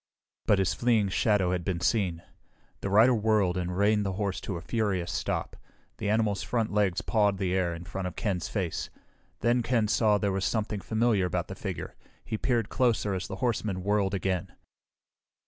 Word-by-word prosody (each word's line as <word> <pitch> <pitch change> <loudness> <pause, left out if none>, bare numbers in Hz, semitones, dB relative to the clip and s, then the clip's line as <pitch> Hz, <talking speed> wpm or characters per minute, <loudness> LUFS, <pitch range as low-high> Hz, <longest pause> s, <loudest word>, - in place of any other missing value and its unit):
But 105 - +5
his 95 -2 +1
fleeing 110 0 +2
shadow 100 -2 +2
had 90 -1 -1
been 90 -2 -2
seen. 85 -1 0 0.6
The 100 - -3
rider 110 +6 +6
whirled 105 -5 +2
and 90 0 -2
reined 105 +1 +3
the 95 -1 -2
horse 100 -1 -2
to 95 - -4
a - - -7
furious 95 -3 -1
stop. - - -2 0.4
The 105 - -1
animal's 105 -3 +1
front 115 -4 -1
legs 100 -4 +2
pawed 105 -3 +2
the 95 -2 -1
air 90 -2 0
in 85 - -8
front 95 0 -4
of 90 - -7
Ken's 95 -5 -2
face. 95 -6 -3 0.5
Then 120 +2 +3
Ken 115 -2 +1
saw 105 -1 +3
there 100 -1 0
was 95 0 -1
something 105 -2 -1
familiar 110 -1 +1
about 90 - -2
the - - -4
figure. - - -5 0.3
He 110 - -3
peered 115 -1 0
closer 115 -5 +1
as 95 -1 -3
the - - -5
horseman 105 -5 -1
whirled 100 -1 +1
again. 95 -1 -2
100 Hz, 185 wpm, -28 LUFS, 95-110 Hz, 0.6 s, rider